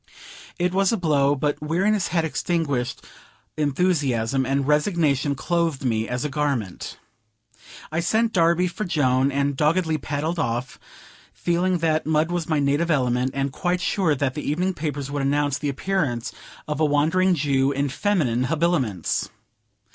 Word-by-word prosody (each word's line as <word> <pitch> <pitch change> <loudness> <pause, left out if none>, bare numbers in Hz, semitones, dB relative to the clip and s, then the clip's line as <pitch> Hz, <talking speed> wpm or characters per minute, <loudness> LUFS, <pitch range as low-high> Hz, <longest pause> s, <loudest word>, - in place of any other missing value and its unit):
It 180 0 0
was 195 0 +3
a 230 - +1
blow; 145 -5 +2
but 145 +2 -1
weariness 185 +6 +1
had 165 -1 0
extinguished 155 -6 -2 0.5
enthusiasm, 140 -5 0
and 135 0 0
resignation 150 -3 +1
clothed 165 -2 -1
me 110 -2 0
as 125 +3 -2
a - - +2
garment. 140 - -3 0.9
I 160 - -1
sent 220 +6 +1
Darby 170 0 +3
for 180 +4 -4
Joan, 135 -6 +2
and 140 0 0
doggedly 160 +2 +1
paddled 155 +4 -3
off, 120 -2 -2 0.6
feeling 180 +1 +1
that 155 -1 +1
mud 160 +1 +1
was 175 -2 -2
my 155 - +2
native 145 +4 +1
element, 125 -4 +1
and 135 0 -1
quite 180 +5 -1
sure 180 -4 +1
that 130 -1 -1
the 150 - -4
evening 180 +7 -1
papers 145 -4 -4
would 145 -1 -2
announce 145 0 +1
the 145 - -2
appearance 140 -6 -1 0.4
of 150 -1 -3
the 155 - +3
Wandering 165 +6 +2
Jew, 140 -2 +1
in 140 +1 0
feminine 140 - 0
habiliments. 145 - 0
150 Hz, 150 wpm, -23 LUFS, 135-170 Hz, 0.9 s, was